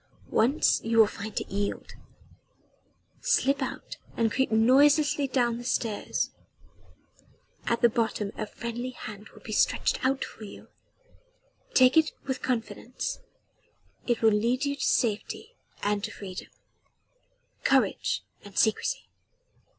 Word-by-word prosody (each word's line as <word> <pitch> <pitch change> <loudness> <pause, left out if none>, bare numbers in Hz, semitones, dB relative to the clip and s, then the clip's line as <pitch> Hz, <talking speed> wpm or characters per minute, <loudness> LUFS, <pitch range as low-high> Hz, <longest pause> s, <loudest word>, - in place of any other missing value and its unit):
Once 260 +8 +3
you 230 0 0
will 220 - +9
find 210 +1 -5
it - - -6
yield. 200 +1 -3 1.3
Slip 280 - +2
out - - -5 0.2
and 225 -1 +2
creep 265 +1 0
noiselessly 280 +6 +4
down 240 -3 +1
the - - -7
stairs. 230 -4 -1 1.4
At 235 - +1
the - - +9
bottom 220 -3 -1
a - - -4
friendly 235 +3 -5
hand 215 -4 -9
will - - -17
be - - -7
stretched - - +1
out 265 +1 +1
for 220 - -12
you. 205 - -11 1.1
Take 255 +2 +6
it 315 -1 +4
with 265 -1 -3
confidence 230 -1 -3 0.9
it 240 -2 0
will 220 - +6
lead 235 +6 +1
you 280 0 -1
to 280 - -9
safety 235 - 0 0.3
and 205 -1 0
to 220 - -2
freedom. 190 -4 -8 1.2
Courage - - +2 0.2
and 205 -1 -12
secrecy." 220 - +1
235 Hz, 125 wpm, -28 LUFS, 215-265 Hz, 1.4 s, will